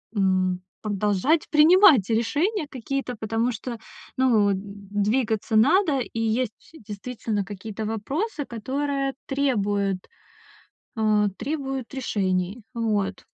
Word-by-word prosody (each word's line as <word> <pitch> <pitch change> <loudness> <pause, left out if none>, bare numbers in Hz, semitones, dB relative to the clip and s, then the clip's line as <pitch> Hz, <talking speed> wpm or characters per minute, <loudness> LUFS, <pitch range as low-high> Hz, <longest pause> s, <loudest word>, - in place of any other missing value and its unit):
м, 185 -2 +1 0.2
продолжать 210 - +1
принимать 310 - +6
решения 290 - 0
какие-то. 260 0 -4
Потому 225 +3 0
что, 235 +1 -6 0.4
ну, 225 -6 +4
м, - - +1
двигаться 205 +3 -1
надо. 305 - +4
И 230 -2 -4
есть 225 0 0 0.2
действительно 215 -3 -4
какие-то 210 +2 -6
вопросы, 285 - -3
которые 275 +4 -2
требуют, 205 -9 0 0.9
э, 215 -2 +3
требуют 270 -4 -4
решений. 195 -3 -1
Вот. 205 -4 -1
225 Hz, 100 wpm, -25 LUFS, 205-270 Hz, 0.9 s, принимать